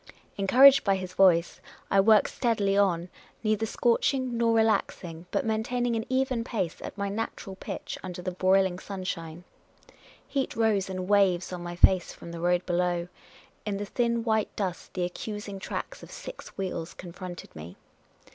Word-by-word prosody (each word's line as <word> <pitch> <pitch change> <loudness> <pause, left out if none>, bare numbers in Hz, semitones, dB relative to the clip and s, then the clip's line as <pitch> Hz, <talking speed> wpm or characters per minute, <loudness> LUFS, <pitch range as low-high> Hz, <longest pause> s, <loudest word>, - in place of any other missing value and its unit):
" - - -32
Encouraged 260 +8 +7
by 195 -1 +3
his 185 -1 -5
voice, 180 -3 +4 0.3
I 195 - +5
worked 215 +1 +5
steadily 210 -5 +1
on, 180 -3 +2 0.3
neither 215 0 +1
scorching 245 +2 +1
nor 230 0 +2
relaxing, 180 -6 0
but - - -1
maintaining 235 +2 0
an 225 +1 -3
even 260 -2 +1
pace 205 -9 -3
at - - -7
my 200 0 -1
natural 200 -2 -4
pitch - - -6
under 180 -1 -7
the 185 - -2
broiling 185 0 +2
sunshine. 175 -4 -6 0.8
Heat 275 -2 -2
rose 215 -4 +1
in 185 -1 -4
waves 190 -3 +2
on 180 - -5
my 175 0 -6
face 180 +1 +4
from 170 - -10
the 170 - -6
road 175 +1 +1
below; 175 -1 0 0.5
in 205 -2 -2
the 205 - -3
thin 235 +1 0
white 220 -2 +1
dust 185 -4 -4
the 180 - 0
accusing 205 +2 -6
tracks - - -5
of - - -12
six - - -9
wheels 180 -3 -4
confronted 180 0 -9
me. 80 +3 -9
195 Hz, 165 wpm, -28 LUFS, 180-225 Hz, 0.8 s, Encouraged